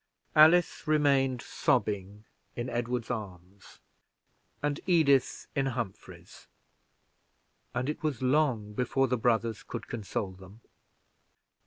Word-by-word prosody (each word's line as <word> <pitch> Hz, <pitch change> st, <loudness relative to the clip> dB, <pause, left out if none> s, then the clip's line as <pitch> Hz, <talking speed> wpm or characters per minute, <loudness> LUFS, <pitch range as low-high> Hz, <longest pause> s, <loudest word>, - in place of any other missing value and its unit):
Alice 160 Hz, +3 st, +5 dB
remained 140 Hz, -4 st, +2 dB
sobbing 100 Hz, 0 st, -1 dB, 0.3 s
in 120 Hz, +1 st, -4 dB
Edward's 120 Hz, 0 st, -2 dB
arms, 95 Hz, -4 st, -8 dB, 0.9 s
and 145 Hz, 0 st, 0 dB
Edith 140 Hz, -7 st, +3 dB
in 135 Hz, -1 st, +1 dB
Humphrey's, 120 Hz, -7 st, -7 dB, 1.3 s
and 125 Hz, +2 st, -1 dB
it 150 Hz, -, -3 dB
was 150 Hz, -7 st, -2 dB
long 130 Hz, -6 st, +1 dB
before 125 Hz, +4 st, +1 dB
the 125 Hz, -, +1 dB
brothers 115 Hz, -2 st, 0 dB
could -, -, -7 dB
console 105 Hz, -3 st, -4 dB
them. 95 Hz, +4 st, -15 dB
120 Hz, 105 wpm, -29 LUFS, 105-140 Hz, 1.3 s, Alice